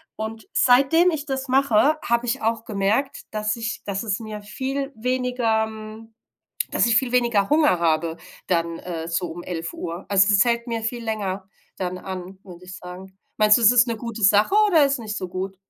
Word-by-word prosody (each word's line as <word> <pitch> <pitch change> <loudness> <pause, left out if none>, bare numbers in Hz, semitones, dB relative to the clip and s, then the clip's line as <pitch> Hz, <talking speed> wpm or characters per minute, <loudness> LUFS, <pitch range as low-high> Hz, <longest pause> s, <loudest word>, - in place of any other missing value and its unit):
Und 220 -1 -6
seitdem 275 +8 +4
ich 300 -2 -4
das 270 -1 -4
mache, 270 +2 +3
habe 235 +1 0
ich 250 +3 -1
auch 225 0 -1
gemerkt, 215 +7 -1
dass 215 0 -1
ich 225 -2 -4
dass 200 0 -3
es 205 -3 -1
mir 215 -2 -7
viel 270 +6 -4
weniger, 250 -2 0
hm 220 +1 -10 0.6
dass - - +2
ich 230 - +3
viel 250 0 +1
weniger 235 -5 +2
Hunger 300 - +4
habe 165 0 0 0.3
dann, 170 -2 0
äh, 165 -2 -6
so 170 +1 -1
um 175 +1 -8
11: 165 -2 -5
Uhr. 170 +2 -6
Also 195 -1 +4
das 205 -1 +5
fällt 235 0 0
mir 230 -2 -3
viel 235 +2 -3
länger 200 -3 -3 0.3
dann 185 -1 -3
an, 185 0 -8
würde 180 -1 -13
ich 185 +1 -9
sagen. 185 +1 -11 0.2
Meinst 210 0 +6
du, 235 - -3
es 215 - +8
ist 245 0 +4
eine 230 - -2
gute 230 -1 -6
Sache 205 - +4
oder 325 -7 +5
ist 275 0 -1
nicht 215 -2 -5
so 185 -2 -4
gut? 190 +2 -5
220 Hz, 200 wpm, -23 LUFS, 190-245 Hz, 0.6 s, es